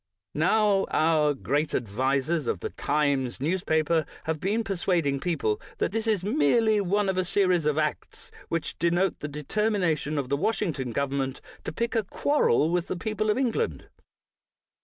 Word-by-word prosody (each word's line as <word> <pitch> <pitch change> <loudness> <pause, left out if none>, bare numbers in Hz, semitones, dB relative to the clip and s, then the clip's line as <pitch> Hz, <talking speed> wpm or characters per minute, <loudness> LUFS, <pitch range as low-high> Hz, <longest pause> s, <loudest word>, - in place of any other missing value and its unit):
Now, 195 +5 +2
our 155 -2 +2
great 145 +3 -1
advisers 130 +6 0
of - - -1
the - - -4
Times 140 -4 0
news 170 +7 -1
paper 160 0 +1 0.2
have 160 -1 -2
been 210 +6 0
persuading 175 -8 0
people 140 -11 -1 0.2
that - - 0
this 225 +1 -2
is 210 -5 +1
merely 210 +4 +3
one 200 +2 +1
of 190 -1 0
a - - +2
series 180 -3 +2
of 150 0 +1
acts 155 -1 -3 0.2
which 165 -2 -3
denote 175 +3 +1
the 150 - -4
determination 155 0 -1
of 140 -3 -1
the 140 - +1
Washington 165 - -1
government 135 +1 -2 0.3
to - - -3
pick 235 0 -2
a 225 - +2
quarrel 195 - +2
with 175 -1 0
the 185 - -3
people 215 +4 -2
of 210 - +2
England. 265 - -1
165 Hz, 160 wpm, -26 LUFS, 145-205 Hz, 0.3 s, merely